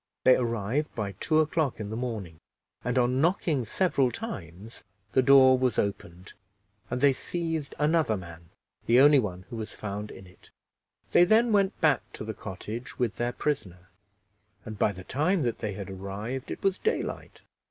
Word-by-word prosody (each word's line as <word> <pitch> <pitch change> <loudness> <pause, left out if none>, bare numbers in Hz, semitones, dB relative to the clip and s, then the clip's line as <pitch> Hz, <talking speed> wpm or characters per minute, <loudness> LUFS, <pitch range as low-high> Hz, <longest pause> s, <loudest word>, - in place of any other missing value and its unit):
They 130 - +7
arrived 115 +4 -1
by 105 -3 -3
two 155 0 +3
o'clock 155 -5 -1
in 105 -1 -5
the - - -3
morning, 110 -9 -5 0.4
and, 125 +1 -1
on 125 +1 +2
knocking 160 - +1
several 140 - +1
times, 100 - -8 0.3
the 130 - +4
door 130 -1 +6
was 130 -1 +1
opened 95 -2 -3 0.6
and 125 +1 -3
they 140 -1 +5
seized 165 0 -4
another 150 -6 +2
man, 85 -2 -11 0.4
the 120 +2 +5
only 145 +1 +7
one 95 -5 -4
who 115 - -5
was 110 -1 -5
found 105 0 -5
in 95 - -11
it. 90 - -19 0.6
They - - +6
then 225 +5 +4
went 200 -2 +2
back 150 -7 +4
to - - -7
the 110 0 -5
cottage 110 +5 -7
with 120 -3 -1
their 120 0 -1
prisoner, 95 -13 -3 0.8
and 110 -2 -8
by - - +3
the 95 -1 -10
time 155 - 0
that 120 -2 -2
they 105 -2 -3
had 100 0 -7
arrived 100 +7 -5
it - - -6
was 195 -1 +1
daylight. 450 - -3
120 Hz, 175 wpm, -27 LUFS, 100-150 Hz, 0.8 s, They